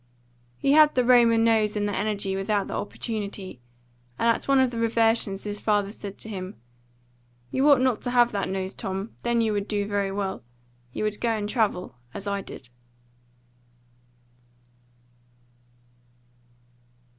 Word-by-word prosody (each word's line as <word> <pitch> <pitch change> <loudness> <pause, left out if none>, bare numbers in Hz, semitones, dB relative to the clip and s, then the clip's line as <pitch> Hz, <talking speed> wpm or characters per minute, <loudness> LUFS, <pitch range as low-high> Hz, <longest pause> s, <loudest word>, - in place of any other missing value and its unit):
He 275 - +1
had 305 0 +6
the 250 -1 +2
Roman 235 -2 +5
nose 220 -2 +2
and 205 0 0
the 205 - -2
energy 200 -2 -1
without 200 +1 -1
the - - -6
opportunity, 205 - -5 0.6
and - - +1
at - - -7
one 275 0 +4
of 260 -2 +3
the 230 - -4
reversions 225 -3 +2
his 205 0 -5
father 205 -2 +1
said 200 -2 -8
to - - -8
him, 190 - -7 0.9
"You 275 +3 +3
ought 280 -3 +6
not 255 -4 +1
to - - -3
have 240 -1 +4
that 200 -2 -2
nose, 190 0 -3
Tom; 195 +3 -5
then 235 -1 +1
you 220 -2 +1
would 205 0 -2
do 205 -1 -1
very 200 -1 -1
well. 195 -1 -3 0.5
You - - -4
would 210 -1 -2
go 235 - +1
and 205 -1 -3
travel, 200 - -1 0.2
as 200 - -6
I 200 -1 -2
did." 125 - -11
210 Hz, 155 wpm, -25 LUFS, 200-230 Hz, 0.9 s, had